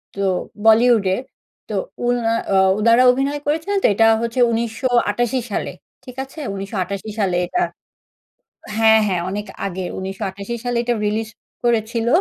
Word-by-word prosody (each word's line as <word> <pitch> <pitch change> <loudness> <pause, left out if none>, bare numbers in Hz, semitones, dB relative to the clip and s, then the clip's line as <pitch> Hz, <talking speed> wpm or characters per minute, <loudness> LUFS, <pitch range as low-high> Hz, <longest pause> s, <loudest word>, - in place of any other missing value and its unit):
তো 200 - -4 0.4
বলিউডের 225 -2 +4 0.5
তো - - -3 0.3
উনা 240 -2 +1 0.2
আ - - +3 0.2
উনারা 230 +3 +5
অভিনয় 275 +3 -1
করেছিলেন 320 +7 0
তো - - +6
এটা 225 +2 +4
হচ্ছে 235 +2 -2
১৯৮৮ 235 +1 0
সালে - - -2 0.3
ঠিক 250 -1 -11
আছে? 270 +4 -12
১৯৮৮ 195 +1 -4
সালে 190 -4 +1
এটা 360 - -1 1.2
হ্যাঁ, 220 0 +6
হ্যাঁ 180 -3 0
অনেক 205 +1 -4 0.2
আগে 190 -1 -4 0.2
১৯৮৮ 195 +3 -5
সালে 245 -1 -1
এটা 240 0 0
রিলিজ 215 +1 -1 0.4
করেছিল। 230 0 0
225 Hz, 135 wpm, -20 LUFS, 200-245 Hz, 1.2 s, তো